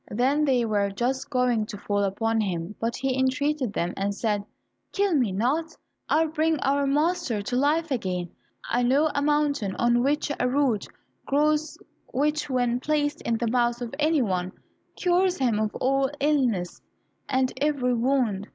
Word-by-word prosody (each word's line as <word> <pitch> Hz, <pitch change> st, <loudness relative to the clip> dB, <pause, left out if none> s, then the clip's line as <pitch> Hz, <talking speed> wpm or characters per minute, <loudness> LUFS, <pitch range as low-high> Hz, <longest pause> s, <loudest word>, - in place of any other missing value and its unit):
Then 270 Hz, +7 st, +1 dB
they 255 Hz, -4 st, +2 dB
were 205 Hz, -2 st, +1 dB
just 255 Hz, +6 st, -2 dB
going 250 Hz, -5 st, +1 dB
to 205 Hz, -, -7 dB
fall 205 Hz, 0 st, -1 dB
upon 225 Hz, +3 st, 0 dB
him, 180 Hz, -2 st, -3 dB
but 230 Hz, +1 st, -1 dB
he 265 Hz, -1 st, -1 dB
entreated 265 Hz, -1 st, 0 dB
them 175 Hz, -1 st, -1 dB
and 200 Hz, +1 st, -2 dB
said, 210 Hz, -2 st, -1 dB, 0.5 s
"Kill 400 Hz, -3 st, +1 dB
me 250 Hz, -9 st, +2 dB
not, 290 Hz, -, -1 dB, 0.3 s
I 320 Hz, +1 st, +3 dB
will 315 Hz, -, -7 dB
bring 320 Hz, -1 st, +1 dB
our 280 Hz, 0 st, +1 dB
master 285 Hz, -, 0 dB
to 245 Hz, -, -3 dB
life 300 Hz, +4 st, +1 dB
again. 180 Hz, -8 st, -2 dB, 0.4 s
I 245 Hz, -, +1 dB
know 280 Hz, +6 st, +3 dB
a 285 Hz, -, 0 dB
mountain 290 Hz, -8 st, +1 dB
on 240 Hz, 0 st, +2 dB
which 290 Hz, +3 st, 0 dB
a 250 Hz, -, +1 dB
root 255 Hz, -6 st, +1 dB, 0.4 s
grows 300 Hz, +2 st, +1 dB, 0.3 s
which, 295 Hz, +3 st, 0 dB
when 245 Hz, -2 st, +1 dB
placed 295 Hz, +1 st, -1 dB
in 230 Hz, -, -1 dB
the 235 Hz, -, -2 dB
mouth 240 Hz, -1 st, +1 dB
of 240 Hz, 0 st, -6 dB
any 305 Hz, -2 st, +3 dB
one, 185 Hz, -3 st, -2 dB, 0.4 s
cures 360 Hz, 0 st, +2 dB
him 240 Hz, -6 st, +1 dB
of 215 Hz, -1 st, -1 dB
all 270 Hz, +1 st, +1 dB
illness 255 Hz, -11 st, 0 dB, 0.5 s
and 260 Hz, -1 st, +1 dB
every 275 Hz, -3 st, +1 dB
wound. 235 Hz, -5 st, 0 dB
255 Hz, 170 wpm, -25 LUFS, 225-295 Hz, 0.5 s, I